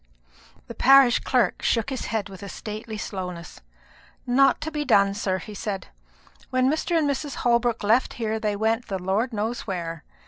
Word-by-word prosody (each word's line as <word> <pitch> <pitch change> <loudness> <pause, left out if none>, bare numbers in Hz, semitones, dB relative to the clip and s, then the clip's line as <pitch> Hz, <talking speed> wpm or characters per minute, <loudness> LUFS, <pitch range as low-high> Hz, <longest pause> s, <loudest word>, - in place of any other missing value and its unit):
The - - -8
parish 270 -2 +6
clerk 245 -8 +1
shook 230 +3 0
his 260 - -3
head 220 -4 -2
with 190 -2 -11
a 200 - -7
stately 215 +2 -6
slowness. 180 -5 -6 0.6
"Not 270 +2 +4
to 315 - -4
be 300 -1 -2
done, 200 -7 +4
sir," 200 -2 -1
he 210 - -9
said: 200 -1 -5 0.6
"when 255 0 +2
Mr. 330 +2 0
and 310 -3 +2
Mrs. 280 0 -2
Holbrook 235 -1 +2
left 225 +5 +2
here 220 -2 -2
they 210 -2 -1
went 225 +3 0
the 195 - -2
Lord 195 +7 -1
knows 225 +2 -3
where. 170 -4 -4
220 Hz, 175 wpm, -24 LUFS, 200-255 Hz, 0.6 s, parish